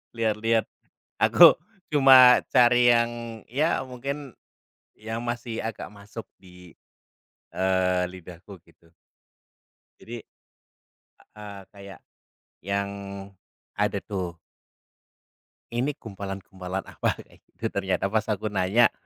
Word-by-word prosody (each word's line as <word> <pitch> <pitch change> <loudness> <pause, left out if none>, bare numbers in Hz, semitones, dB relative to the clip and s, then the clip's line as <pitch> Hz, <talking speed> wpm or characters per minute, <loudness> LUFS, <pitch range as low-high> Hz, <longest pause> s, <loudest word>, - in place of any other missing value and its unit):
Lihat-lihat, 115 0 +1 0.5
aku - - +7 0.3
cuma 130 -3 +8
cari 120 0 +5
yang, 115 0 +2 0.4
ya 145 +2 0
mungkin 135 +1 -7 0.6
yang 110 +2 -5
masih 120 -1 -4
agak 115 -1 -5
masuk 105 +3 -10 0.2
di, 90 -2 -16 0.8
eee, 95 -1 +1
lidahku, 90 +2 -12
gitu. 85 0 -26 1.1
Jadi 120 +1 -8 1.2
heeh, 105 -2 -9
kayak 100 -1 -12 0.7
yang 100 +1 -1 0.9
ada - - +1
tuh. 90 -4 -4 1.4
Ini 130 +5 -1
gumpalan-gumpalan, 95 -4 -6
apa, - - -2
kayak - - -23
gitu, - - -8
ternyata 95 0 -1
pas 110 0 +1
aku 105 0 -2
nanya, 100 +5 +3
105 Hz, 95 wpm, -25 LUFS, 95-120 Hz, 1.4 s, cuma